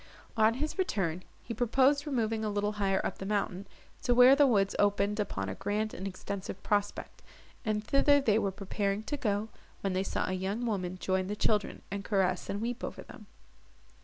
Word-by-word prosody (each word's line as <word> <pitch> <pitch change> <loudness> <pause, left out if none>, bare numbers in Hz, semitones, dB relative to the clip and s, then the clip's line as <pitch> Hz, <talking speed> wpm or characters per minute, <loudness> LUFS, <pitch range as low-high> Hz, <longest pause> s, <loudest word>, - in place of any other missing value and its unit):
On 220 0 +4
his 305 +8 -3
return, 185 - 0 0.2
he 230 - -5
proposed 265 +6 +2
removing 225 -5 0
a 215 - 0
little 205 0 0
higher 195 -2 0
up - - -3
the - - -5
mountain, 200 -2 -1 0.3
to 245 - +2
where 250 +2 +8
the 290 0 +5
woods 200 -5 +2
opened 205 +1 +2
upon 95 - -2
a 95 - -3
grand 210 - -2
and 190 - -5
extensive 195 0 -6
prospect; 205 -1 -1 0.4
and 215 -2 -1
thither 285 +3 +4
they 220 -6 +3
were 200 - 0
preparing 200 +1 -2
to 290 - -3
go, 215 -5 -1 0.3
when 195 -1 -1
they 185 - +1
saw 195 - -2
a 185 - -1
young 195 +6 -2
woman 185 -5 -2
join 185 0 0
the 205 - -3
children, 210 0 0
and 200 0 -3
caress 190 -4 0
and 200 - -2
weep 240 +1 -3
over - - -5
them. - - -13
205 Hz, 190 wpm, -30 LUFS, 195-230 Hz, 0.4 s, where